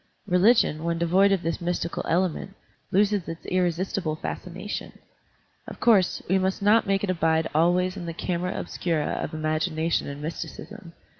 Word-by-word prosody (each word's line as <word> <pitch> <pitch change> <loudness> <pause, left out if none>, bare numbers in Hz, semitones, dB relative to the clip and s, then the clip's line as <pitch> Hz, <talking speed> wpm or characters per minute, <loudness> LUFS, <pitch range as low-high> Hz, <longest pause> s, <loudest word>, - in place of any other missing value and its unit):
Religion, 180 -4 +3
when 170 0 0
devoid 185 +4 +3
of 190 -3 +1
this 165 +1 -2
mystical 170 0 -2
element, 185 +2 0 0.4
loses 200 -1 +2
its 165 0 -7
irresistible 180 -2 -1
fascination. 185 +5 -6 0.7
Of - - -9
cotirse, 205 -6 +3
we 190 +2 +3
must 190 0 0
not 210 +2 +4
make 195 0 +1
it 195 - +1
abide 160 -2 +1
always 180 +4 +2
in 175 -3 -6
the - - -2
camera 180 +1 -2
obscura 165 -4 -2
of - - -4
imagination 155 +1 0
and 140 0 -6
mysti 160 +2 -4
cism. 210 -6 -11
180 Hz, 155 wpm, -25 LUFS, 165-195 Hz, 0.7 s, not